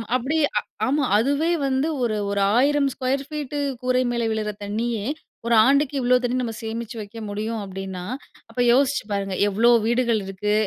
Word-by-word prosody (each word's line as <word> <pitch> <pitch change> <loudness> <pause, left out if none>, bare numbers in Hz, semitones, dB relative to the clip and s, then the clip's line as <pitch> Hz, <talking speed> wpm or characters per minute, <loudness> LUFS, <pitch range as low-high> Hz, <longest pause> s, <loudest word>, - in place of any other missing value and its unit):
அப்படி 265 +6 0 0.5
ஆமா. 285 +2 +1
அதுவே 285 +8 +1 0.2
வந்து 265 +3 +1 0.2
ஒரு, 225 -3 0
ஒரு 200 0 0 0.2
1000 285 +2 +3
ஸ்கொயர் 270 +1 -1
ஃபீட் 295 -2 -5 0.3
கூரை 255 0 +2
மேல 235 -1 -1
விழுகிற 215 -1 -2
தண்ணீயே 215 +1 -2 0.4
ஒரு 235 - +4
ஆண்டுக்கு 280 +2 +3
இவ்வளோ 250 0 +3
தண்ணீ 245 0 0
நம்ம 230 -2 -3
சேமிச்சு 230 +1 -5
வைக்க 215 +2 -9
முடியும். 215 +2 -3
அப்பிடின்னா 190 -1 -6 0.5
அப்போ 250 - -2
யோசித்து 270 0 +2
பாருங்க, 195 -1 -2
எவ்வளோ 225 +4 +3 0.2
வீடுகள் 235 -2 +2
இருக்கு 195 +2 -2
235 Hz, 155 wpm, -23 LUFS, 210-265 Hz, 0.5 s, ஒரு